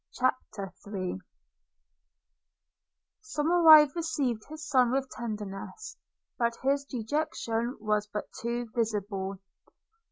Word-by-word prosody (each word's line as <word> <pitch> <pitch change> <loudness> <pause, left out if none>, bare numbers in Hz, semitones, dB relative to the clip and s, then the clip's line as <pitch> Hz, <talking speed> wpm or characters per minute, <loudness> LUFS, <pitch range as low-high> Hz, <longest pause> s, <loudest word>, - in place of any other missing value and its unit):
CHAPTER 225 -6 -2
III 185 - -3 2.0
SOMERIVE 315 -5 +6
received 280 -9 -1
his 310 0 -8
son 250 -3 +4
with 265 0 -1
tenderness; 215 - -6 0.4
but 235 -1 +1
his 280 +1 +2
dejection 240 -2 -2
was 210 -1 0
but 210 0 -4 0.2
too 235 +1 -2
visible. 205 -4 -1
235 Hz, 90 wpm, -29 LUFS, 210-285 Hz, 2.0 s, SOMERIVE